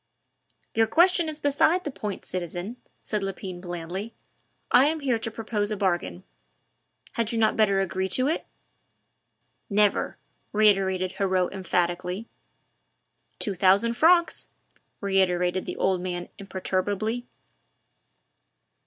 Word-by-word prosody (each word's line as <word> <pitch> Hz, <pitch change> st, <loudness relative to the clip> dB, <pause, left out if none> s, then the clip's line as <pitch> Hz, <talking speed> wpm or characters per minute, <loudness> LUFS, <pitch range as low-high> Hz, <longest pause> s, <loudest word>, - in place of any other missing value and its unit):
"Your 225 Hz, 0 st, +3 dB
question 345 Hz, +5 st, +4 dB
is 305 Hz, -, -4 dB
beside 305 Hz, +5 st, +2 dB
the 295 Hz, -, -4 dB
point, 210 Hz, -6 st, -5 dB
citizen," 180 Hz, +5 st, -4 dB, 0.3 s
said 210 Hz, -1 st, -2 dB
Lepine 190 Hz, -2 st, -5 dB
blandly; 175 Hz, +4 st, -5 dB, 0.6 s
"I 265 Hz, -, +7 dB
am 315 Hz, 0 st, -1 dB
here 250 Hz, -5 st, +1 dB
to 225 Hz, -, -2 dB
propose 215 Hz, -2 st, -2 dB
a 215 Hz, -, -2 dB
bargain. 175 Hz, -, -1 dB, 0.9 s
Had 230 Hz, -1 st, -1 dB
you 230 Hz, -, -1 dB
not 220 Hz, -1 st, +3 dB
better 200 Hz, -3 st, +3 dB
agree 190 Hz, 0 st, -1 dB
to 255 Hz, +5 st, +1 dB
it?" 320 Hz, -, -1 dB, 1.2 s
"Never!" 205 Hz, 0 st, +2 dB, 0.4 s
reiterated 195 Hz, -3 st, +3 dB
Heriot 185 Hz, -2 st, +1 dB
emphatically. 180 Hz, +2 st, -1 dB, 1.1 s
"Two 205 Hz, -, 0 dB
thousand 195 Hz, +5 st, +4 dB
francs," 340 Hz, +6 st, +3 dB, 0.5 s
reiterated 185 Hz, -2 st, +1 dB
the -, -, -4 dB
old 190 Hz, -1 st, +1 dB
man 175 Hz, -1 st, -4 dB
imperturbably. 200 Hz, +4 st, -2 dB
200 Hz, 115 wpm, -26 LUFS, 185-230 Hz, 1.2 s, I